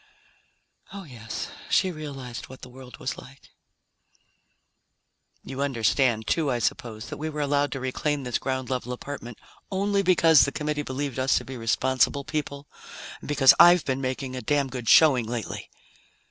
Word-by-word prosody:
Oh, 200 Hz, -1 st, -8 dB
yes, 115 Hz, -8 st, -7 dB, 0.2 s
she 185 Hz, -, +2 dB
realized 140 Hz, -7 st, -7 dB
what 130 Hz, -, -12 dB
the 125 Hz, -, -9 dB
world 125 Hz, -2 st, -12 dB
was 130 Hz, -, -4 dB
like. 140 Hz, +2 st, -16 dB, 1.9 s
"You 135 Hz, +1 st, -6 dB
understand, 120 Hz, -3 st, +1 dB
too, 155 Hz, +7 st, 0 dB
I 125 Hz, -, 0 dB
suppose, 110 Hz, -1 st, -3 dB
that -, -, -6 dB
we 155 Hz, +2 st, -4 dB
were 150 Hz, -1 st, -6 dB
allowed 145 Hz, 0 st, +1 dB
to 135 Hz, -, -4 dB
reclaim 140 Hz, +2 st, -2 dB
this 125 Hz, -2 st, -2 dB
ground 130 Hz, -1 st, -3 dB
level 125 Hz, -1 st, -3 dB
apartment 125 Hz, -3 st, -8 dB, 0.3 s
only 200 Hz, +1 st, 0 dB
because 165 Hz, -4 st, +5 dB
the 140 Hz, -, 0 dB
Committee 150 Hz, +1 st, -2 dB
believed 135 Hz, -1 st, -4 dB
us 130 Hz, +1 st, +2 dB
to -, -, -3 dB
be 130 Hz, -, -7 dB
responsible 130 Hz, +4 st, +1 dB
people, 145 Hz, -2 st, -4 dB, 0.5 s
and -, -, -11 dB
because 135 Hz, -3 st, +6 dB
I've 175 Hz, -1 st, +7 dB
been 135 Hz, 0 st, -1 dB
making 130 Hz, 0 st, -3 dB
a 130 Hz, -, -4 dB
damn 145 Hz, -1 st, 0 dB
good 120 Hz, -4 st, -4 dB
showing 130 Hz, -8 st, +6 dB
lately?" 115 Hz, -3 st, -5 dB
135 Hz, 160 wpm, -25 LUFS, 125-145 Hz, 1.9 s, I've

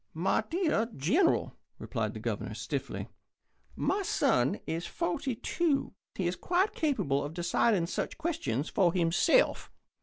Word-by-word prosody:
"My 185 Hz, +6 st, +1 dB
dear 315 Hz, -, +1 dB
General," 305 Hz, -, +2 dB, 0.2 s
replied -, -, -3 dB
the -, -, -5 dB
Governor, -, -, -3 dB
stiffly, -, -, -4 dB, 0.7 s
"my 405 Hz, -, 0 dB
son 130 Hz, -, +2 dB
is 165 Hz, +2 st, -3 dB
forty 290 Hz, -7 st, -2 dB
two. 305 Hz, +4 st, 0 dB, 0.2 s
He 190 Hz, -, -2 dB
is 175 Hz, +1 st, 0 dB
quite 370 Hz, -, +1 dB
capable 145 Hz, -, 0 dB
of 145 Hz, +3 st, -6 dB
deciding 175 Hz, +2 st, +2 dB
such 170 Hz, -, -3 dB
questions 320 Hz, -, -2 dB
for 180 Hz, -4 st, +2 dB
himself. 180 Hz, -, +3 dB
220 Hz, 130 wpm, -30 LUFS, -, 0.7 s, himself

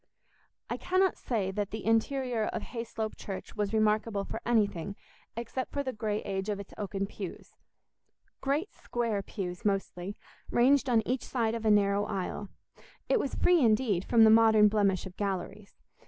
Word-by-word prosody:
I -, -, -3 dB
cannot 370 Hz, 0 st, +2 dB
say 205 Hz, -6 st, -2 dB
that 205 Hz, 0 st, -2 dB
the 220 Hz, -, -6 dB
interior 230 Hz, 0 st, +1 dB
of 220 Hz, -, -3 dB
Hayslope 230 Hz, -2 st, -5 dB
Church 195 Hz, -2 st, -7 dB
was 205 Hz, -2 st, -1 dB
remarkable 215 Hz, -1 st, +1 dB
for -, -, -6 dB
anything 200 Hz, -5 st, +1 dB, 0.4 s
except 240 Hz, +2 st, -4 dB
for 285 Hz, -, -1 dB
the 260 Hz, -2 st, -3 dB
grey 215 Hz, -1 st, -2 dB
age 195 Hz, +1 st, -3 dB
of 205 Hz, -1 st, -2 dB
its 200 Hz, -, -9 dB
oaken 200 Hz, -1 st, -3 dB
pews—great 275 Hz, -, -7 dB
square 230 Hz, -4 st, -2 dB
pews 180 Hz, -3 st, -6 dB
mostly, 195 Hz, -1 st, -2 dB, 0.3 s
ranged 270 Hz, +3 st, +4 dB
on 225 Hz, -3 st, +2 dB
each 255 Hz, 0 st, 0 dB
side 230 Hz, -3 st, -1 dB
of 230 Hz, -1 st, -4 dB
a -, -, +5 dB
narrow 205 Hz, -1 st, +3 dB
aisle. 195 Hz, 0 st, -4 dB, 0.6 s
It -, -, +4 dB
was 280 Hz, -, -2 dB
free, 355 Hz, -2 st, +4 dB
indeed, 215 Hz, -5 st, +3 dB
from 230 Hz, +1 st, +5 dB
the 220 Hz, -, +8 dB
modern 220 Hz, -1 st, +6 dB
blemish 200 Hz, -3 st, +1 dB
of 185 Hz, -1 st, -9 dB
galleries. 200 Hz, +1 st, -4 dB
215 Hz, 160 wpm, -30 LUFS, 200-235 Hz, 0.6 s, the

